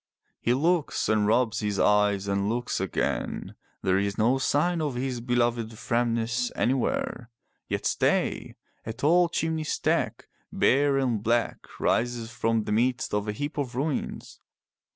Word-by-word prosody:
He 120 Hz, -, +1 dB
looks 165 Hz, +3 st, +1 dB
and 105 Hz, -1 st, +2 dB
rubs 115 Hz, 0 st, +2 dB
his 105 Hz, -2 st, -2 dB
eyes 105 Hz, -1 st, +3 dB
and 100 Hz, +1 st, 0 dB
looks 120 Hz, +2 st, -1 dB
again. -, -, -2 dB, 0.3 s
There 95 Hz, 0 st, +2 dB
is 100 Hz, 0 st, -2 dB
no 120 Hz, +5 st, +3 dB
sign 160 Hz, +5 st, +1 dB
of 145 Hz, -4 st, -2 dB
his 125 Hz, -1 st, -2 dB
beloved 120 Hz, -2 st, 0 dB
Framnas 115 Hz, +1 st, 0 dB
anywhere. 125 Hz, -1 st, -1 dB, 0.4 s
Yet -, -, -3 dB
stay! -, -, 0 dB, 0.3 s
A 110 Hz, -, -5 dB
tall 170 Hz, +7 st, +3 dB
chimney 160 Hz, -1 st, -1 dB
stack, 155 Hz, -, -1 dB, 0.2 s
bare 140 Hz, +1 st, +3 dB
and 125 Hz, -6 st, 0 dB
black, 115 Hz, +2 st, 0 dB
rises 120 Hz, -1 st, 0 dB
from 115 Hz, 0 st, 0 dB
the 105 Hz, -, -4 dB
midst 125 Hz, +3 st, +1 dB
of 105 Hz, 0 st, 0 dB
a -, -, 0 dB
heap 145 Hz, +7 st, -4 dB
of 125 Hz, -4 st, -3 dB
ruins. 140 Hz, +2 st, -3 dB
120 Hz, 145 wpm, -27 LUFS, 110-135 Hz, 0.4 s, eyes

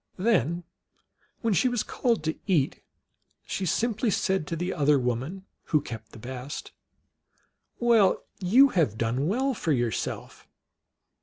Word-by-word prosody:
Then, 180 Hz, -, +1 dB, 0.8 s
when 230 Hz, -3 st, +1 dB
she 195 Hz, -, +3 dB
was 245 Hz, -3 st, 0 dB
called 235 Hz, -, 0 dB
to 160 Hz, 0 st, 0 dB
eat, 160 Hz, -9 st, +1 dB, 0.6 s
she 190 Hz, -, -3 dB
simply 225 Hz, +5 st, +1 dB
said 190 Hz, -4 st, 0 dB
to 165 Hz, -, -2 dB
the 175 Hz, +3 st, -2 dB
other 150 Hz, -2 st, +3 dB
woman, 130 Hz, +10 st, -2 dB, 0.2 s
who 155 Hz, -, +2 dB
kept 115 Hz, -6 st, -8 dB
the -, -, -12 dB
best, 130 Hz, +4 st, -7 dB, 0.5 s
" -, -, -42 dB, 0.3 s
Well, 230 Hz, -5 st, +4 dB, 0.2 s
you 235 Hz, +9 st, +6 dB
have 155 Hz, -, +1 dB
done 120 Hz, +6 st, 0 dB
well 260 Hz, +8 st, +1 dB
for 170 Hz, -8 st, -2 dB
yourself 120 Hz, -5 st, -2 dB
175 Hz, 140 wpm, -27 LUFS, 135-220 Hz, 0.8 s, you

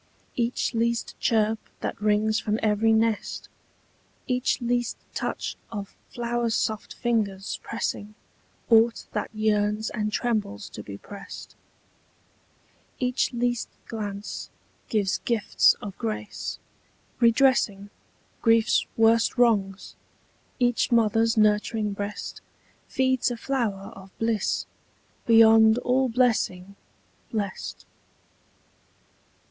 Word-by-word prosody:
Each 240 Hz, +1 st, 0 dB
least 235 Hz, 0 st, 0 dB
chirp 220 Hz, -1 st, +2 dB, 0.2 s
that -, -, -4 dB
rings 215 Hz, +1 st, +2 dB
from 215 Hz, +1 st, -1 dB
every 215 Hz, +1 st, +3 dB
nest, 220 Hz, -1 st, 0 dB, 0.8 s
Each 250 Hz, -1 st, 0 dB
least 240 Hz, -1 st, -1 dB, 0.2 s
touch -, -, -3 dB, 0.2 s
of 205 Hz, -3 st, -6 dB
flower 240 Hz, 0 st, -1 dB
soft 220 Hz, -1 st, -2 dB
fingers 210 Hz, -5 st, -1 dB
pressing 210 Hz, +1 st, -4 dB, 0.6 s
Aught 230 Hz, +1 st, +4 dB
that -, -, -2 dB
yearns 215 Hz, 0 st, 0 dB
and 215 Hz, -2 st, -2 dB
trembles 210 Hz, -, -2 dB
to -, -, -7 dB
be 100 Hz, -1 st, -8 dB
prest, 200 Hz, -, -10 dB, 1.4 s
Each 250 Hz, 0 st, 0 dB
least 240 Hz, -1 st, -1 dB, 0.2 s
glance, 205 Hz, -2 st, -5 dB, 0.4 s
gives 205 Hz, -4 st, +1 dB
gifts 230 Hz, -4 st, +3 dB
of 200 Hz, -2 st, -6 dB
grace, 215 Hz, -2 st, -4 dB, 0.6 s
redressing 230 Hz, -5 st, +3 dB, 0.5 s
Grief's 225 Hz, -1 st, +3 dB
worst 225 Hz, +2 st, +4 dB
wrongs: 205 Hz, -5 st, +1 dB, 0.6 s
each 245 Hz, -1 st, +1 dB
mother's 225 Hz, 0 st, +3 dB
nurturing 210 Hz, 0 st, +2 dB
breast 205 Hz, +1 st, -5 dB, 0.5 s
Feeds 260 Hz, -1 st, +1 dB
a 240 Hz, -, -4 dB
flower 225 Hz, -7 st, -2 dB
of 195 Hz, 0 st, -12 dB
bliss, 225 Hz, -3 st, 0 dB, 0.6 s
beyond 225 Hz, -1 st, +7 dB
all 255 Hz, +1 st, +1 dB
blessing 220 Hz, -6 st, +1 dB, 0.6 s
Blest. 205 Hz, -4 st, -4 dB
220 Hz, 100 wpm, -26 LUFS, 210-235 Hz, 1.4 s, beyond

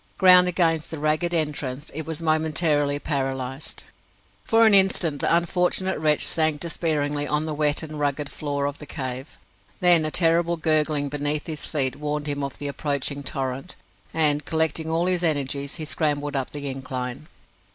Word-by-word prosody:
Ground 180 Hz, -1 st, +8 dB
against 165 Hz, -3 st, +1 dB
the 160 Hz, -, -6 dB
ragged 155 Hz, +3 st, 0 dB
entrance, 150 Hz, -4 st, -3 dB
it 160 Hz, +2 st, -5 dB
was 160 Hz, 0 st, -5 dB
momentarily 155 Hz, -2 st, +1 dB
paralysed. 135 Hz, -1 st, -4 dB, 0.6 s
For 225 Hz, 0 st, +4 dB
an 220 Hz, -, +6 dB
instant 190 Hz, -6 st, +3 dB
the -, -, +1 dB
unfortunate 180 Hz, +2 st, 0 dB
wretch 150 Hz, -1 st, +2 dB
sank 155 Hz, -2 st, +1 dB
despairingly 150 Hz, -3 st, -1 dB
on 150 Hz, +1 st, 0 dB
the 155 Hz, -, -3 dB
wet 150 Hz, +1 st, +1 dB
and 155 Hz, -1 st, -7 dB
rugged 145 Hz, 0 st, -1 dB
floor 145 Hz, -1 st, -3 dB
of 145 Hz, 0 st, -4 dB
the 150 Hz, -, -10 dB
cave; 130 Hz, -1 st, -6 dB, 0.4 s
then 175 Hz, -3 st, +6 dB
a 155 Hz, -, -1 dB
terrible 170 Hz, +1 st, +2 dB
gurgling 155 Hz, -2 st, +1 dB
beneath 145 Hz, +1 st, -1 dB
his 155 Hz, -3 st, -4 dB
feet 135 Hz, -3 st, 0 dB
warned 150 Hz, 0 st, -3 dB
him 145 Hz, -1 st, -2 dB
of 140 Hz, -2 st, -5 dB
the 145 Hz, -, -5 dB
approaching 140 Hz, 0 st, -2 dB
torrent, 135 Hz, +3 st, -4 dB, 0.4 s
and, 150 Hz, -2 st, +2 dB
collecting 160 Hz, 0 st, 0 dB
all 165 Hz, +2 st, 0 dB
his 180 Hz, -1 st, +1 dB
energies, 140 Hz, -3 st, -1 dB
he 160 Hz, -, -4 dB
scrambled 145 Hz, -2 st, -1 dB
up 135 Hz, -2 st, -2 dB
the 145 Hz, -1 st, -6 dB
incline. 130 Hz, +1 st, -5 dB
150 Hz, 165 wpm, -24 LUFS, 145-160 Hz, 0.6 s, Ground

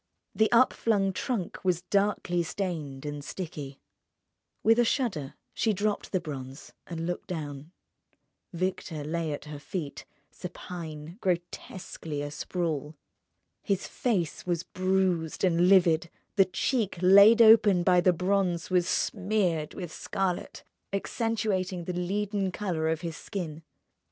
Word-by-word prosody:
The 220 Hz, 0 st, +2 dB
up 240 Hz, +2 st, +5 dB
flung 195 Hz, -4 st, +1 dB
trunk 210 Hz, -4 st, -3 dB
was 180 Hz, -2 st, +1 dB
darkly 195 Hz, -2 st, +1 dB
stained 160 Hz, -6 st, -4 dB
and 145 Hz, -1 st, -5 dB
sticky.... 145 Hz, -6 st, -6 dB, 0.8 s
With 225 Hz, +2 st, +5 dB
a -, -, +6 dB
shudder 215 Hz, -, -1 dB, 0.2 s
she 220 Hz, -, +1 dB
dropped 205 Hz, +1 st, -1 dB
the 185 Hz, -, +1 dB
bronze, 135 Hz, -3 st, -8 dB
and 165 Hz, -1 st, -4 dB
looked 175 Hz, 0 st, -4 dB
down. 150 Hz, -3 st, -6 dB, 0.8 s
Victor 175 Hz, -3 st, -3 dB
lay 160 Hz, +1 st, -2 dB
at 145 Hz, -, -5 dB
her 150 Hz, -1 st, -7 dB
feet, 150 Hz, -1 st, -5 dB, 0.3 s
supine, 170 Hz, -1 st, -8 dB
grotesquely 175 Hz, -4 st, -3 dB
asprawl. 150 Hz, 0 st, -3 dB, 0.7 s
His 195 Hz, -3 st, -1 dB
face 195 Hz, -, -1 dB
was 175 Hz, -1 st, -1 dB
bruised 185 Hz, -4 st, 0 dB
and 175 Hz, -1 st, +4 dB
livid; 175 Hz, -3 st, +5 dB, 0.3 s
the 195 Hz, -2 st, +6 dB
cheek 210 Hz, +2 st, -1 dB
laid 200 Hz, +5 st, +8 dB
open 220 Hz, -5 st, +7 dB
by 180 Hz, -1 st, +5 dB
the 185 Hz, -, +5 dB
bronze 180 Hz, 0 st, 0 dB
was 180 Hz, -1 st, +3 dB
smeared 185 Hz, -8 st, 0 dB
with 175 Hz, -4 st, -6 dB
scarlet, 190 Hz, -2 st, -3 dB, 0.3 s
accentuating 195 Hz, -3 st, -1 dB
the 180 Hz, -, -4 dB
leaden 195 Hz, +2 st, -1 dB
colour 175 Hz, -5 st, -2 dB
of 160 Hz, -1 st, -1 dB
his 165 Hz, -2 st, -5 dB
skin. 165 Hz, -6 st, -5 dB
180 Hz, 125 wpm, -28 LUFS, 160-195 Hz, 0.8 s, laid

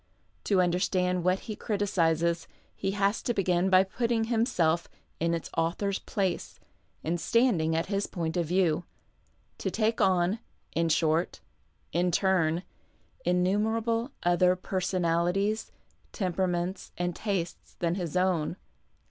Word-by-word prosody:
To 195 Hz, -3 st, +3 dB
understand 180 Hz, 0 st, +1 dB
what 185 Hz, +1 st, +2 dB
he 215 Hz, -, -6 dB
criticizes 170 Hz, -6 st, 0 dB, 0.3 s
he 195 Hz, -, -2 dB
has 200 Hz, +1 st, +1 dB
to 240 Hz, -, -1 dB
begin 185 Hz, -1 st, +2 dB
by 185 Hz, 0 st, +6 dB
putting 230 Hz, +3 st, 0 dB
himself 200 Hz, -8 st, +1 dB, 0.3 s
in 170 Hz, +1 st, +1 dB
its 165 Hz, -, -6 dB
author's 190 Hz, +4 st, 0 dB
place 190 Hz, -3 st, -2 dB, 0.4 s
and 165 Hz, +2 st, -1 dB
standing 185 Hz, -10 st, +2 dB
at 165 Hz, -, +1 dB
his 200 Hz, 0 st, -1 dB
point 165 Hz, -2 st, -3 dB
of 170 Hz, -3 st, 0 dB
view 175 Hz, -2 st, +2 dB, 0.4 s
— -, -, -40 dB
to -, -, -1 dB
take 220 Hz, 0 st, 0 dB
on, 185 Hz, +2 st, +3 dB, 0.3 s
in 165 Hz, 0 st, +1 dB
short, 160 Hz, +1 st, +1 dB, 0.5 s
in 175 Hz, +2 st, +2 dB
turn, 175 Hz, -2 st, +2 dB, 0.6 s
innumerable 220 Hz, +7 st, +1 dB
other 180 Hz, +1 st, +4 dB
personalities, 185 Hz, +2 st, 0 dB, 0.4 s
temperaments, 180 Hz, -1 st, -1 dB
and 175 Hz, -1 st, -1 dB
tastes 190 Hz, -6 st, -3 dB
than 170 Hz, -1 st, 0 dB
his 175 Hz, -2 st, -2 dB
own. 180 Hz, -3 st, +1 dB
180 Hz, 125 wpm, -28 LUFS, 170-200 Hz, 0.6 s, by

